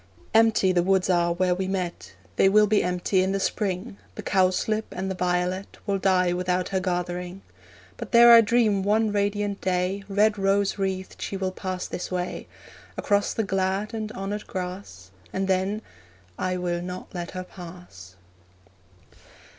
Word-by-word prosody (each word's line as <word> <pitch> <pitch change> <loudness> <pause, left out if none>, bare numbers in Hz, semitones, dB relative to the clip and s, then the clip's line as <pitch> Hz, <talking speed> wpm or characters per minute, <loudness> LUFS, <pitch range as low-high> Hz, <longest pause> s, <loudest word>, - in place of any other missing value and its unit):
Empty 220 -4 +4
the 180 -1 +3
woods 190 +1 +2
are 170 -1 +2
where 180 +1 +1
we 185 +1 -2
met 180 - -4 0.2
They 195 - +5
will 210 +2 +5
be 210 0 +2
empty 180 +1 +1
in 190 +1 0
the 195 - 0
spring; 195 +1 -2 0.2
The - - -7
cowslip 195 +3 +1
and 190 +1 -3
the - - -3
violet 180 +1 -1
Will 200 -1 0
die 180 -2 +2
without 180 0 -1
her 190 - 0
gathering. 180 0 -3 0.5
But - - -7
dare 235 0 +8
I 230 - +10
dream 220 -3 +2
one 215 +2 +2
radiant 205 0 -1
day 185 +2 -1
Red 210 +1 +2
rose 195 +1 +1
wreathed 190 -1 -3
she 195 - -3
will 190 -1 -2
pass 185 -1 -4
this 180 - -5
way 180 0 -3 0.5
Across 205 0 +1
the 225 - 0
glad 195 +2 -1
and 215 -1 -4
honoured 200 +2 -5
grass; 180 - -7 0.2
And 190 0 -2
then 190 +3 0 0.5
I 185 - -2
will 175 -1 -2
not 180 +1 -7
let 175 -1 -5
her 185 - -3
pass. 175 - -12
190 Hz, 160 wpm, -25 LUFS, 180-200 Hz, 0.5 s, I